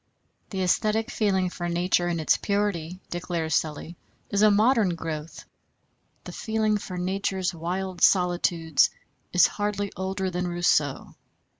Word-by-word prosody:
"The 195 Hz, -, -6 dB
æsthetic 215 Hz, +5 st, +1 dB
feeling 190 Hz, -4 st, +1 dB
for 175 Hz, -1 st, -4 dB
nature 175 Hz, 0 st, +1 dB
in 170 Hz, -1 st, -1 dB
its 155 Hz, -, +3 dB
purity," 195 Hz, -4 st, -2 dB
declares 170 Hz, -2 st, -2 dB
Sully, 155 Hz, +2 st, -2 dB, 0.3 s
"is 200 Hz, -, +1 dB
a 215 Hz, -, +7 dB
modern 210 Hz, -3 st, +3 dB
growth... 160 Hz, -1 st, -6 dB, 0.8 s
the -, -, -8 dB
feeling 220 Hz, -1 st, 0 dB
for 185 Hz, -2 st, -7 dB
nature's 190 Hz, 0 st, -1 dB
wild 180 Hz, +2 st, -4 dB
solitudes 175 Hz, -4 st, +3 dB, 0.4 s
is 180 Hz, -, +6 dB
hardly 205 Hz, -1 st, -2 dB
older 190 Hz, 0 st, -2 dB
than 180 Hz, 0 st, -2 dB
Rousseau." 175 Hz, -5 st, 0 dB
180 Hz, 130 wpm, -26 LUFS, 170-200 Hz, 0.8 s, a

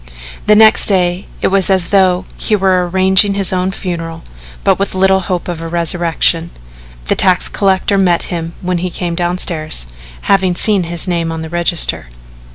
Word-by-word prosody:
The 210 Hz, -, +5 dB
next 220 Hz, 0 st, +6 dB
day 180 Hz, -1 st, +1 dB, 0.2 s
it -, -, +2 dB
was 195 Hz, -1 st, +2 dB
as 190 Hz, -3 st, +1 dB
though 190 Hz, -2 st, +2 dB
he 215 Hz, -, -1 dB
were 185 Hz, -3 st, +1 dB
arranging 190 Hz, +2 st, +2 dB
his 195 Hz, -1 st, -2 dB
own 185 Hz, 0 st, -1 dB
funeral, 165 Hz, -3 st, -6 dB, 0.4 s
with -, -, +4 dB
but 200 Hz, -1 st, -3 dB
little 190 Hz, 0 st, +3 dB
hope 180 Hz, -2 st, -4 dB
of 175 Hz, -2 st, -5 dB
a 165 Hz, -, -6 dB
resurrection. 170 Hz, 0 st, 0 dB, 0.6 s
The -, -, +1 dB
tax 185 Hz, -2 st, +2 dB
collector 195 Hz, 0 st, 0 dB
met 175 Hz, -3 st, +1 dB
him 165 Hz, -1 st, -5 dB
when 180 Hz, -1 st, -2 dB
he 180 Hz, +1 st, -3 dB
came 175 Hz, -1 st, -4 dB
downstairs 170 Hz, -, -2 dB, 0.4 s
having 190 Hz, -2 st, +1 dB
seen 200 Hz, -2 st, +3 dB
his 170 Hz, +1 st, -2 dB
name 170 Hz, -2 st, -2 dB
on 160 Hz, 0 st, -5 dB
the 160 Hz, -, -8 dB
register. 170 Hz, -, 0 dB
180 Hz, 170 wpm, -13 LUFS, 170-190 Hz, 0.6 s, next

